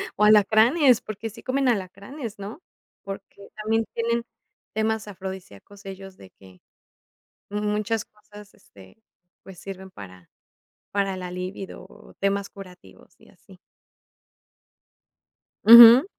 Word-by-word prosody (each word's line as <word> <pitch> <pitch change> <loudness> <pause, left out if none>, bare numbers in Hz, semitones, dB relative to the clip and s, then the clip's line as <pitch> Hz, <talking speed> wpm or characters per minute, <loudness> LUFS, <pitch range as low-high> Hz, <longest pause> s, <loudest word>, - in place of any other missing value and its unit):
O 210 - 0
alacranes, 220 - +4
porque 215 +1 -7
sí 225 +2 -14
comen 270 +1 -1
alacranes, 205 +3 -4
¿no? 210 - -9 0.4
Porque 195 0 -10
también 220 +1 -1
tienen 235 0 -1 0.5
temas 220 0 -1
afrodisíacos 190 - -10
ellos, 195 0 -10
de 95 - -15
que 95 -1 -19 0.9
muchas 210 +1 -2
cosas, 210 -1 -17
este, 100 - -20 0.4
pues, 190 -2 -13
sirven 190 -1 -9
para 95 - -13 0.6
para 195 -2 -1
la 180 -1 -6
líbido 185 +2 -7
o - - -18
temas 200 0 -1
curativos, 180 - -15
y - - -21
así. - - -20 2.1
Ajá. 235 +4 +10
205 Hz, 110 wpm, -24 LUFS, 190-220 Hz, 2.1 s, Ajá